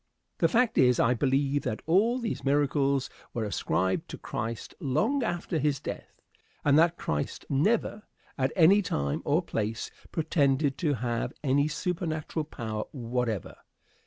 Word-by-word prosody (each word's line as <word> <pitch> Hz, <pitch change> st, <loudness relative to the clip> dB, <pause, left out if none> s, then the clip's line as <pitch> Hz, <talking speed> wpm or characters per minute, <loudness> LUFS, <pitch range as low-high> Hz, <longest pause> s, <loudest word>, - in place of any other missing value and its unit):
The -, -, +5 dB
fact 240 Hz, -1 st, +2 dB
is, 125 Hz, -2 st, +5 dB
I 120 Hz, -, +4 dB
believe 140 Hz, +3 st, +1 dB
that 110 Hz, -, -4 dB
all 205 Hz, +9 st, +3 dB
these 235 Hz, -3 st, -3 dB
miracles 140 Hz, -1 st, +2 dB, 0.3 s
were 115 Hz, -, -1 dB
ascribed 95 Hz, -2 st, -1 dB
to -, -, -6 dB
Christ 115 Hz, +1 st, -5 dB
long 190 Hz, -, +1 dB
after 175 Hz, -6 st, -1 dB
his 145 Hz, -2 st, +1 dB
death, -, -, -7 dB, 0.5 s
and 145 Hz, -1 st, +5 dB
that 170 Hz, +1 st, +3 dB
Christ 75 Hz, -1 st, -3 dB
never, 205 Hz, +8 st, +1 dB, 0.3 s
at 130 Hz, 0 st, 0 dB
any 190 Hz, +4 st, +6 dB
time 70 Hz, -, -2 dB
or -, -, +2 dB
place, 110 Hz, +2 st, -3 dB, 0.2 s
pretended 145 Hz, -3 st, +1 dB
to 150 Hz, -5 st, +1 dB
have 120 Hz, -1 st, -2 dB
any 145 Hz, +1 st, +3 dB
supernatural 160 Hz, -1 st, -2 dB
power 110 Hz, -7 st, -4 dB
whatever. 120 Hz, -, -3 dB
140 Hz, 140 wpm, -28 LUFS, 120-165 Hz, 0.5 s, any